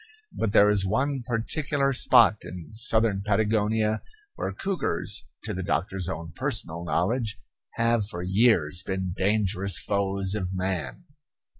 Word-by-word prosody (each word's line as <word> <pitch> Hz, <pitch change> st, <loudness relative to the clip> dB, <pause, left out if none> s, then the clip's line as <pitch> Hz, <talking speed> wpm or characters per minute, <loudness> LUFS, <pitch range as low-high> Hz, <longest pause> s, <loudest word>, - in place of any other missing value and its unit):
But 110 Hz, -, -1 dB
there 105 Hz, +1 st, +5 dB
is 100 Hz, -2 st, +2 dB
one 130 Hz, +8 st, -1 dB
particular 140 Hz, +4 st, 0 dB
spot -, -, +6 dB
in 90 Hz, +2 st, -10 dB
southern 110 Hz, -3 st, +2 dB
Patagonia 110 Hz, +1 st, +1 dB, 0.3 s
where -, -, -4 dB
cougars, 190 Hz, -, -2 dB, 0.2 s
to -, -, -4 dB
the 95 Hz, -, -4 dB
doctor's 95 Hz, 0 st, -2 dB
own 80 Hz, -2 st, -6 dB
personal 110 Hz, -, -1 dB
knowledge, 110 Hz, +7 st, -1 dB, 0.4 s
have 115 Hz, -2 st, +1 dB
for 90 Hz, -4 st, -6 dB
years 90 Hz, -4 st, +2 dB
been 95 Hz, -2 st, -3 dB
dangerous 100 Hz, -2 st, +1 dB
foes 100 Hz, -1 st, -1 dB
of 95 Hz, -3 st, -3 dB
man. 95 Hz, -, -3 dB
100 Hz, 130 wpm, -26 LUFS, 95-115 Hz, 0.4 s, spot